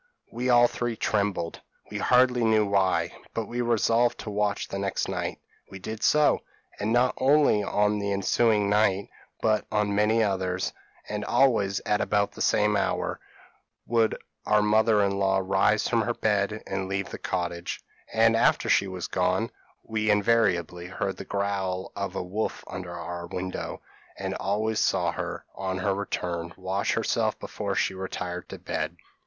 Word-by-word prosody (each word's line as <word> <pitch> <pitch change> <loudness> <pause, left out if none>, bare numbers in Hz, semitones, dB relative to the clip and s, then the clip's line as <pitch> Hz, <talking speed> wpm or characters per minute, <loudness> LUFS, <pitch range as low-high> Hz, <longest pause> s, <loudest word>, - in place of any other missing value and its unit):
p> - - -36
"We 125 +1 0
all 120 -1 +7
three 120 -1 -3
trembled 100 -6 -1 0.3
we - - -3
hardly 125 -1 +4
knew 110 -1 +4
why; 100 -2 +1 0.2
but 115 - -1
we 120 +2 -3
resolved 120 0 +2
to 105 - -6
watch 105 0 0
the 100 - -4
next 100 -1 -1
night: - - -3 0.3
we 95 - -8
did 110 +4 -6
so; 150 0 +4 0.4
and 105 +2 -1
not 125 +2 +3
only 140 -5 +4
on 105 +1 +1
the 100 0 -2
ensuing 105 +1 +2
night, 100 -1 +2 0.3
but 110 -1 +2
on 105 -1 +1
many 110 +2 +3
others, 95 -2 -1 0.3
and 105 0 -3
always 105 -6 +2
at 105 - 0
about 100 -1 +1
the - - -9
same 105 0 +3
hour, 100 - -1 0.7
would 115 -1 +2 0.3
our 105 0 +3
mother 110 0 +4
in 100 0 0
law 95 0 +2
rise 95 +3 +2
from 115 -1 +2
her 120 +2 -1
bed 105 0 0
and 95 -1 -3
leave 100 0 -2
the - - -6
cottage; 85 -1 -3 0.3
and - - +4
after - - +3
she 100 - +4
was 95 -2 -5
gone 95 +5 0 0.3
we 110 -1 -1
invariably 100 -5 +2
heard 95 +1 -3
the - - -7
growl 100 -2 -2
of 100 -1 -4
a 95 - -2
wolf 100 +5 -3
under 90 -1 -7
our 85 0 -6
window, 90 +1 -5 0.3
and - - -3
always 110 +3 -1
saw - - +2
her, - - -5
on 95 -1 -3
her 95 +2 0
return, 85 -4 -3
wash 95 +1 -1
herself - - 0
before 100 -2 -4
she 95 0 +1
retired 90 -1 -5
to - - -7
bed. - - -3
100 Hz, 165 wpm, -27 LUFS, 95-110 Hz, 0.7 s, all